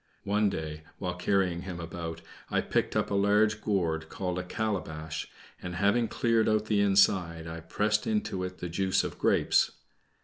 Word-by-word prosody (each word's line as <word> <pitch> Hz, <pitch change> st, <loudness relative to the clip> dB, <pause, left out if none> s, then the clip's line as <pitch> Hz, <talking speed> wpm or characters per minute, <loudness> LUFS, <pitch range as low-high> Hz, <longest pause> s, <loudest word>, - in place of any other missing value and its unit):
One 105 Hz, +1 st, +2 dB
day, 80 Hz, -4 st, -5 dB, 0.2 s
while 90 Hz, -2 st, -3 dB
carrying 90 Hz, -1 st, +1 dB
him 90 Hz, -2 st, -6 dB
about, 85 Hz, -1 st, -6 dB, 0.3 s
I -, -, +1 dB
picked -, -, -1 dB
up -, -, 0 dB
a -, -, 0 dB
large 105 Hz, +2 st, +3 dB
gourd 80 Hz, -6 st, 0 dB
called 90 Hz, -1 st, -3 dB
a -, -, -3 dB
calabash, 80 Hz, -6 st, -3 dB, 0.3 s
and, 90 Hz, -1 st, -5 dB
having 100 Hz, +5 st, +2 dB
cleared 115 Hz, -1 st, +2 dB
out 110 Hz, 0 st, +2 dB
the 105 Hz, -2 st, +2 dB
inside, 95 Hz, -4 st, +3 dB
I 80 Hz, 0 st, -6 dB
pressed 105 Hz, +6 st, 0 dB
into 210 Hz, -, -1 dB
it 90 Hz, 0 st, -5 dB
the 90 Hz, -, -4 dB
juice 95 Hz, +2 st, +1 dB
of -, -, -5 dB
grapes. -, -, +3 dB
95 Hz, 170 wpm, -29 LUFS, 85-105 Hz, 0.3 s, large